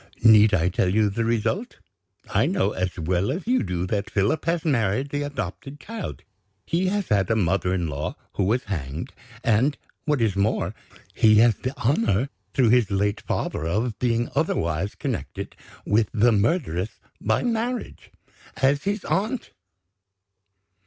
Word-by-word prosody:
Need 110 -2 +7
I 85 0 +2
tell 90 0 +1
you 105 +1 +2
the 115 +4 -1
result? 120 - -1 0.5
I - - +2
know, 175 - +1
as 90 -2 -3
well 90 +6 0
as 175 +7 -4
you 255 +2 +2
do, 90 0 -2
that 100 +2 -2
Philip 105 +9 0
has 165 0 0
married 130 -2 +1
the 145 0 -2
adopted 140 0 -5
child. 225 -2 -7 0.4
He 180 +3 0
has 200 0 -1
had 100 -4 +2
a 110 - +3
mother 95 -2 +1
in 90 -2 0
law 75 0 -4 0.2
who 95 - 0
was 120 +6 +1
hanged, 80 -6 -5 0.3
and, 120 +6 +2 0.3
what 150 -3 +1
is 110 -4 +1
more, 100 +2 0 0.4
he 110 -1 +5
has 115 +2 +6
the 130 +2 -4
honor, 115 -1 +1 0.3
through 125 -4 +4
his 120 -3 +4
late 100 +1 0
father, 80 - -2
of 105 +5 -1
being 120 -1 +1
otherwise 95 - 0
connected - - -4 0.3
with 105 +1 +2
the 120 +2 +4
murderess 105 - 0 0.2
by - - +1
marriage 240 +1 -2 0.5
as 140 +3 +2
his 200 0 -1
aunt!" 220 +6 -1
110 Hz, 155 wpm, -24 LUFS, 95-145 Hz, 0.5 s, Need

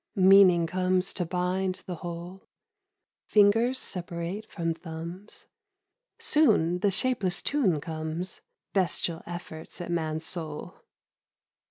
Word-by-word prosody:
Meaning 185 -3 +6
comes 185 +2 +1
to 175 -3 -2
bind 185 +1 -1
the 180 -2 -5
whole, 175 +2 -8 0.8
Fingers 225 +5 +4
separate 175 +2 -5
from 165 -2 -1
thumbs, 170 +5 -9 0.7
Soon 180 - +3
the 200 - +2
shapeless 195 -3 +1
tune 215 - +1
comes: 160 +3 -5 0.3
Bestial 175 -3 +1
efforts 170 -1 -8
at 175 -1 -5
man's 160 -1 -2
soul. 155 -4 -3
180 Hz, 105 wpm, -27 LUFS, 165-190 Hz, 0.8 s, Meaning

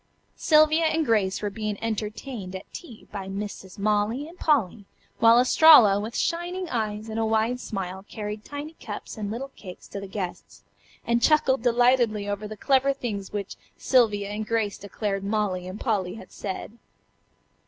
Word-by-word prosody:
Sylvia 310 +1 +4
and 320 0 +1
Grace 210 -5 +1
were 205 - -1
being 215 -1 -3
entertained 215 -2 -4
at 190 - -10
tea 245 -11 -10
by 195 -2 -6
Misses 195 -1 -6
Molly 210 +7 0
and 345 +2 -14
Polly, 225 - +1 0.3
while 230 +1 +7
Estralla 250 -6 +7
with 220 +3 -5
shining 350 +2 -2
eyes 215 -2 -2
and 220 0 -4
a 225 - +1
wide 225 +3 +1
smile 190 -4 -5
carried 210 0 -5
tiny 290 +4 -7
cups - - -7
and 210 -3 -4
little 250 +6 -5
cakes 180 -3 -11
to 200 - -6
the 200 - -7
guests, 190 -2 -6 0.4
and 235 0 +1
chuckled 295 -3 +3
delightedly 240 -3 +3
over 205 +1 -3
the 215 0 -8
clever 275 +4 +2
things 210 -8 -5
which 200 -2 -5 0.2
Sylvia 210 -6 +2
and 210 +1 -4
Grace 220 -3 -1
declared 200 0 -3
Molly 200 -3 -1
and 185 +3 -7
Polly 200 -6 -1
had 225 - -12
said. 210 +3 -6
215 Hz, 165 wpm, -25 LUFS, 200-250 Hz, 0.4 s, while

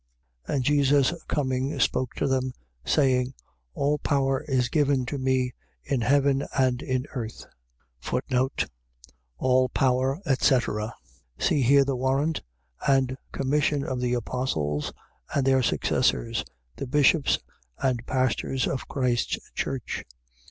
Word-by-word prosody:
28:18. - - -1
And 135 - +1
Jesus 140 +1 +3
coming, 130 -1 -1
spoke 130 -1 +1
to - - 0
them, 130 -1 0 0.3
saying: 130 - +2 0.4
All 145 +1 +1
power 135 -1 +1
is 130 -3 +2
given 140 -2 +2
to 140 +3 -4
me 130 -1 +1 0.3
in 135 -3 -1
heaven 140 +2 +3
and 130 -1 +2
in 130 -1 -1
earth. 115 -5 -5 1.9
All 130 - +3
power, 130 +3 +1
etc.. 120 -5 +1 0.4
.See 145 - +2
here 140 +2 +5
the 135 -1 -1
warrant 135 +5 0 0.5
and 135 -2 +3 0.2
commission 145 +1 +1
of 130 -2 -3
the 125 0 +1
apostles 80 - -2 0.4
and 140 -2 +2
their 135 -1 +4
successors, 65 - +1 0.3
the 135 - -4
bishops 145 +2 +4 0.4
and 125 -3 0
pastors 130 0 0
of 135 - -3
Christ's 125 -3 0 0.2
church. 130 -3 -3
130 Hz, 120 wpm, -26 LUFS, 125-140 Hz, 1.9 s, here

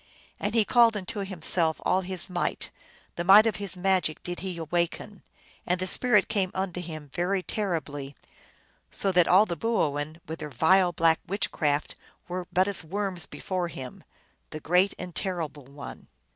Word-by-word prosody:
And 205 +2 -2
he 220 -2 +4
called 235 -2 +4
unto 200 +2 -5
himself 175 -4 +2
all 185 - +2
his 185 -1 +1
might, 180 -2 -2 0.5
the 175 - -1
might 200 +4 +8
of 225 - 0
his 200 -2 -2
magic 180 -4 +1
did 175 0 -5
he 185 -1 -5
awaken, 175 +5 -2 0.4
and 180 +1 0
the 185 - -1
spirit 245 +6 +2
came 200 -4 0
unto 185 -2 -2
him 155 -4 -8
very 185 +2 0
terribly, 155 -10 -3 0.7
so 195 - -1
that 180 -2 +4
all 195 +4 +6
the 175 - -3
boo 225 +8 -1
oin^ 145 -1 -1
with 160 +1 -6
their 150 -1 -6
vile 175 +7 +4
black 165 -1 +3
witchcraft, 155 -6 -1 0.3
were 180 0 -5
but 185 +2 +3
as 200 -4 +3
worms 190 0 -3
before 185 -2 -3
him, 130 -6 -9 0.5
the 155 - -7
Great 180 +5 +2
and 180 -1 -7
Terrible 160 -7 -4
One. 140 0 -10
180 Hz, 170 wpm, -27 LUFS, 160-195 Hz, 0.7 s, might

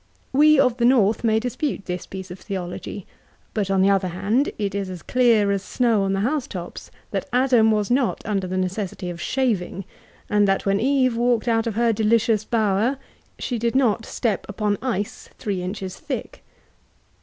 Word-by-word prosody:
We 300 +1 +6
of 250 -3 +3
the 240 - +2
north 225 -4 +3
may 220 -1 +3
dispute 250 -1 -3
this 180 -1 -5
i»ece 190 -1 -7
of 180 - -8
theology; 185 +1 -6 0.5
but 205 -3 -1
on 190 -1 +3
the 200 - +5
other 195 -1 +2
hand, 210 - 0
it 200 -3 -2
is 200 -1 -3
as 180 -2 -8
clear 230 -5 +3
as 200 -1 0
the - - -15
snow 235 -4 +2
qicl 195 - 0
the 195 - 0
house 270 +5 0
tops, 175 -2 -7 0.2
that - - -3
Adam 250 -3 +4
was 210 0 +1
not 255 -1 +1
under 195 -3 -1
the 185 +1 -3
necessity 185 -1 -3
of 170 0 -8
shaving; 205 -8 -1 0.4
and 205 -1 +3
that 195 0 +1
when 195 0 +2
Eve 255 0 +2
walked 240 0 +1
out 225 0 +2
of 220 - -2
her 235 0 +2
delicious 220 0 +2
bower, 220 +3 +1 0.4
she 245 -3 -3
did 235 +2 -1
not 235 -4 +2
step 220 -5 -1
upon 205 0 -1
ice 220 -6 -3
three 195 -4 -3
inches 185 0 -5
thick. - - -6
215 Hz, 190 wpm, -23 LUFS, 195-240 Hz, 0.5 s, We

